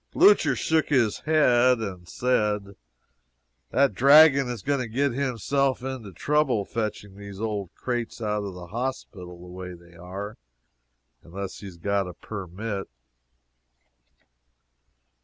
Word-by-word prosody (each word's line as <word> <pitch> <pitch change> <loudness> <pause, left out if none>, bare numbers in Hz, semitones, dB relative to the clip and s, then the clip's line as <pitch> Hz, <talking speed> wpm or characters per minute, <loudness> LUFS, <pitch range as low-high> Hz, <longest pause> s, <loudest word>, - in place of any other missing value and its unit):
Blucher 410 +2 +5
shook 160 -1 +1
his 120 -7 +2
head 125 -5 +4
and 95 -6 -6
said: 105 -5 0 0.9
"That 140 0 +3
dragon 140 -1 +6
is 120 -6 -5
going 140 -1 0
to 125 - -3
get 135 +5 0
himself 135 +1 0
into 130 -6 -5
trouble 130 - +1
fetching 105 -3 -4
these 100 -1 -10
old 105 -4 -3
crates 120 -2 -3
out 105 -2 -1
of 100 -2 -6
the 90 -1 -8
hospital 95 -5 -5
the 90 - -12
way 90 0 -8
they 85 0 -18
are, 95 +5 -7 0.8
unless 95 +3 -7
he 100 - -9
has 90 -3 -11
got 100 +2 0
a 90 - -7
permit." 100 +1 -6
110 Hz, 130 wpm, -25 LUFS, 95-130 Hz, 0.9 s, dragon